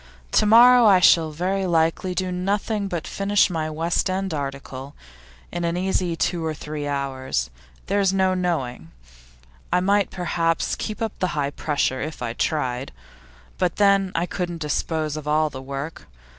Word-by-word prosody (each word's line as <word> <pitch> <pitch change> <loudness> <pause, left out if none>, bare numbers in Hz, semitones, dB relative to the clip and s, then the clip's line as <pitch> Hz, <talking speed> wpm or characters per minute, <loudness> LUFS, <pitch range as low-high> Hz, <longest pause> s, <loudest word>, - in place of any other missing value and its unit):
To 215 - +3
morrow 240 +2 +8
I 195 -3 +6
shall 165 -2 +5
very 185 +5 -1
likely 165 +2 +1
do 185 0 -1
nothing 200 +3 -1
but 175 -4 -4
finish 200 0 +2
my 160 -2 -2
West 165 +4 0
End 190 -1 -2
article, 140 -1 -6 0.6
in 175 0 -3
an 170 +1 -1
easy 185 -2 0
two 170 0 -1
or 160 -1 -2
three 150 0 -5
hours. 130 - -2 0.3
There's 200 -2 +2
no 190 -1 +2
knowing; 160 - -2 0.8
I 180 - +3
might 200 +2 +2
perhaps 170 -2 -1
keep 215 +1 -4
up 220 - -2
the 180 -4 -1
high 140 -1 0
pressure 145 -3 -1
if 155 +1 -5
I 115 -1 -3
tried. 130 -2 -2 0.7
But 180 -2 +1
then 200 -2 +3
I 170 - +1
couldn't 175 -1 -4
dispose 155 0 -2
of 155 -1 -7
all 155 0 +2
the 130 - -7
work. 140 +4 -6
170 Hz, 160 wpm, -23 LUFS, 150-190 Hz, 0.8 s, morrow